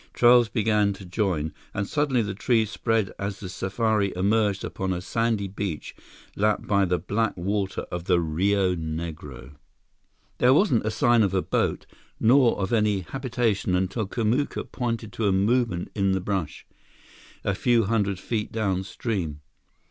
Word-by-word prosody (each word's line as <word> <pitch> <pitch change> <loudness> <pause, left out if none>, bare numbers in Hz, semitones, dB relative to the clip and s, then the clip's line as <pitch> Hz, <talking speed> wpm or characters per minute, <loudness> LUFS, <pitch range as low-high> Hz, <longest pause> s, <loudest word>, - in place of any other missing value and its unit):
Trails 120 -1 +5
began 105 -3 +2
to 95 0 -11
join, 90 -5 -1 0.2
and 100 -1 -1
suddenly 140 -5 +1
the 105 -1 -3
trees 110 +1 +1
spread 115 -4 0
as 100 0 -4
the 95 - -6
safari 100 +2 0
emerged 100 +1 +1
upon 95 -1 -3
a 90 - -3
sandy 110 +1 -1
beach 95 -4 -5 0.4
lapped 105 +1 +1
by 100 -1 +2
the 90 -1 +1
black 105 +5 -1
water 95 +2 -2
of 90 -1 -4
the 90 -2 +3
Rio 90 +4 +1
Negro. 80 -5 -6 0.8
There 125 +2 +5
wasn't 135 - +3
a - - +2
sign 120 +1 +3
of 100 -2 +1
a 95 - +1
boat - - -1 0.3
nor 125 +1 +4
of 95 +2 -2
any 105 -3 +2
habitation 115 -3 -1
until 95 +4 -1
Kamuka 120 +6 -1
pointed 115 -4 -3
to 110 - 0
a - - +3
movement 100 -1 +1
in 100 -2 +1
the 95 - +1
brush, 95 -4 -3 0.8
a 100 - 0
few 120 +2 +2
hundred 100 -2 0
feet 105 +2 -3
downstream. 95 -2 -2
Mr. 75 - -14
100 Hz, 155 wpm, -25 LUFS, 95-115 Hz, 0.8 s, Trails